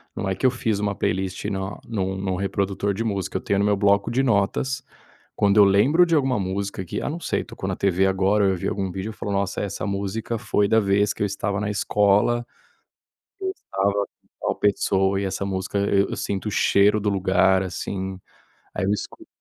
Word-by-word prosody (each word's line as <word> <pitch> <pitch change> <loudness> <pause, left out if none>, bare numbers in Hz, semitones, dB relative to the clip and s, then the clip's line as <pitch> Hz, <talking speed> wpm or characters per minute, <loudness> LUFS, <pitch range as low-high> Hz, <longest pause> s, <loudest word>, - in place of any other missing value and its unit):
não 95 - -2
é - - +1
que 95 - -2
eu 130 - +5
fiz 115 -4 -1
uma 100 -1 -1
playlist 95 0 -2
na 95 -1 -3
num 95 -4 -2
num 95 -1 -2
reprodutor 100 +1 -1
de 110 +4 -2
música, 100 -5 -2
eu - - -5
tenho 100 - 0
no 100 - +2
meu 105 0 +3
bloco 100 +1 +3
de 130 +3 +1
notas, 120 +3 +1 0.5
quando 100 0 +2
eu 105 - +8
lembro 125 - +5
de 165 -1 +1
alguma 135 -6 +2
música 95 0 -3
que, - - -4
ah, - - -2
não 160 +4 -4
sei, - - -1
tocou - - -7
na - - -1
TV, 95 0 +2
agora 95 +2 +2
eu 95 -1 +2
vi 85 - -3
algum 95 -1 -2
vídeo 95 +4 -4
e - - -11
falou: 105 -1 -4
“Nossa, 100 0 -1
essa 100 -2 -4
música 100 +3 -3
foi 105 -1 +1
da 110 - +5
vez 100 -1 +2
que - - -10
eu - - +3
estava 100 0 -2
na 105 - -1
escola, 105 +3 +2 1.0
eu 380 -1 -1
estava 95 +1 -1 0.5
com - - 0
a - - -8
pessoa 95 -1 +1
e - - -2
essa 95 +1 -2
música 95 +1 -2
eu 100 0 +2
eu - - -3
sinto 100 +1 -3
o - - -2
cheiro 100 +1 +3
do 105 - -1
lugar, 95 -1 +3
assim”, 95 +1 -4 0.6
aí - - -1
eu 100 - +2
escuto 105 - -5
100 Hz, 215 wpm, -23 LUFS, 95-105 Hz, 1.0 s, eu